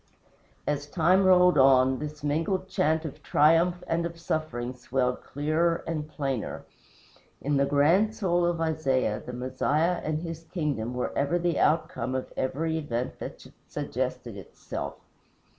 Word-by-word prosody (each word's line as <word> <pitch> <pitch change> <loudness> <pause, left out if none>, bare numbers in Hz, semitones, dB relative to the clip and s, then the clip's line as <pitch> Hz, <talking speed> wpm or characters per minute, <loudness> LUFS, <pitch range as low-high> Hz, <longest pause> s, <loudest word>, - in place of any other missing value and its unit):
As 145 0 -2
time 180 +4 +3
rolled 180 -4 +6
on, 130 -1 +5
this 150 -1 -7
mingled 165 +6 0
chant 160 -3 +1
of 155 - -7
triumph 165 +4 +3
and 165 +1 0
of 170 0 -5
suffering 155 -7 -2
swelled 125 0 -1
clearer 160 +4 0
and 155 -2 -3
plainer. 135 -6 -3 0.8
In 145 0 0
the 140 0 +2
grand 165 +10 +3
soul 175 -4 +1
of 175 -1 -1
Isaiah, 135 -9 0
the 125 - -7
Messiah 145 +7 0
and 155 +1 -2
his 165 -1 -6
kingdom 145 -10 -2
were 125 - -2
ever 145 +5 +1
the 175 -1 0
outcome 155 -4 +1
of 130 - -4
every 160 +5 -1
event 125 -5 -3
that - - -8 0.2
suggested - - -4
itself. - - -6
155 Hz, 140 wpm, -27 LUFS, 135-170 Hz, 0.8 s, rolled